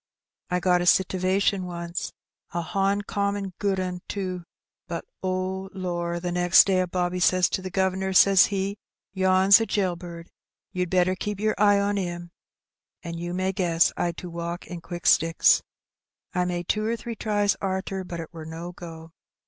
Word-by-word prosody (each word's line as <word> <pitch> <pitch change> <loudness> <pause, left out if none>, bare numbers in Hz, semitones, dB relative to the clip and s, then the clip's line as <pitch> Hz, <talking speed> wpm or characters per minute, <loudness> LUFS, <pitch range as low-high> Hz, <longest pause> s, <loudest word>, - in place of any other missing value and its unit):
I 180 0 +1
got 180 0 +2
a 175 - -1
sitivation 190 +2 +2
once, 170 0 -5 0.4
a 170 - -1
honcommon 200 +1 -1
good 195 -2 0
'un, 180 -1 -3
too; 185 -3 -4 0.4
but, - - -5 0.2
oh, 185 +1 -2
lor, 175 -2 -3
the 175 0 -3
next 175 0 +6
day 190 -2 +2
a 185 - +1
bobby 180 0 -1
says 185 0 +4
to - - -2
the 185 - -5
guv'nor, 190 0 0
says 195 0 +6
he, 200 +1 -3 0.3
'Yen's 190 +2 +5
a 225 - -1
jail 190 -4 0
bird, 170 -1 -10 0.4
you'd 180 -1 -2
better 185 0 +2
keep 205 +1 -4
yer 215 0 +1
eye 205 -1 +5
on 200 0 0
'im;' 175 -2 -5 0.7
an' 170 -1 -6
you 175 +1 -4
may 185 +1 0
guess 175 -3 +2
I'd 170 -1 -2
to 180 - -7
walk 170 +1 -5
in 175 -2 -8
quick 175 0 -8
sticks. 165 +1 +4 0.7
I 180 -1 +1
made 175 -1 -3
two 215 - 0
or 225 +2 0
three 230 +1 -6
tries 205 -2 +1
arter, 190 0 -2
but 175 -2 -7
it 165 0 -8
wur 165 -1 -8
no 165 +2 -7
go. 165 -2 -10
185 Hz, 175 wpm, -25 LUFS, 175-195 Hz, 0.7 s, next